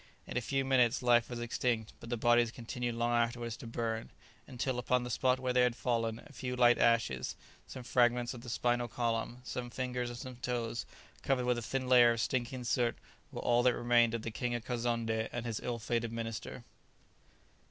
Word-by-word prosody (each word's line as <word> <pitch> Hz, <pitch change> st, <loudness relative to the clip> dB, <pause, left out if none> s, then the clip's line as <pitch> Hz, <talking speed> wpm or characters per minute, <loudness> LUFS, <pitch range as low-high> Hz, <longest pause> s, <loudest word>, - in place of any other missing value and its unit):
In -, -, -7 dB
a 125 Hz, -, +1 dB
few 135 Hz, +2 st, -1 dB
minutes 125 Hz, -3 st, +3 dB
life 120 Hz, -1 st, +4 dB
was 120 Hz, -1 st, -5 dB
extinct, 120 Hz, -1 st, -1 dB
but 115 Hz, -, -10 dB
the 120 Hz, -, -1 dB
bodies 120 Hz, 0 st, +4 dB
continued 120 Hz, 0 st, -4 dB
long 120 Hz, +1 st, 0 dB
afterwards 120 Hz, 0 st, 0 dB
to -, -, -9 dB
burn; 115 Hz, -1 st, -3 dB, 0.4 s
until, 130 Hz, -1 st, -2 dB
upon 125 Hz, +1 st, +1 dB
the 125 Hz, -, -5 dB
spot 130 Hz, +3 st, +2 dB
where 130 Hz, -1 st, -1 dB
they 125 Hz, -, +4 dB
had 125 Hz, -1 st, +3 dB
fallen, 115 Hz, -3 st, -1 dB
a 145 Hz, -, -15 dB
few 125 Hz, -1 st, -4 dB
light 120 Hz, -1 st, +5 dB
ashes, 115 Hz, -, +2 dB, 0.3 s
some 130 Hz, -, -8 dB
fragments 120 Hz, 0 st, +2 dB
of 120 Hz, -, -9 dB
the 120 Hz, -, -9 dB
spinal 120 Hz, +1 st, +1 dB
column, 115 Hz, +1 st, -2 dB
some 125 Hz, -1 st, -5 dB
fingers 125 Hz, 0 st, -3 dB
and 120 Hz, -, -7 dB
some 130 Hz, 0 st, -8 dB
toes, 120 Hz, -2 st, -3 dB, 0.3 s
covered 130 Hz, -2 st, +1 dB
with 125 Hz, -1 st, +1 dB
a -, -, -6 dB
thin 130 Hz, +3 st, -2 dB
layer 120 Hz, -2 st, +7 dB
of 115 Hz, -, -4 dB
stinking 125 Hz, +1 st, -2 dB
soot, 120 Hz, +1 st, +1 dB, 0.3 s
were -, -, -5 dB
all 120 Hz, 0 st, +3 dB
that 125 Hz, 0 st, +3 dB
remained 120 Hz, -1 st, +3 dB
of 115 Hz, -, -4 dB
the 115 Hz, -, -4 dB
King 120 Hz, +2 st, -2 dB
of 115 Hz, -1 st, -5 dB
Kazonndé 115 Hz, -2 st, -1 dB
and 120 Hz, -1 st, -4 dB
his 115 Hz, -3 st, -2 dB
ill 120 Hz, -1 st, -3 dB
fated 115 Hz, 0 st, -2 dB
minister. 115 Hz, -, -5 dB
120 Hz, 205 wpm, -33 LUFS, 115-125 Hz, 0.4 s, layer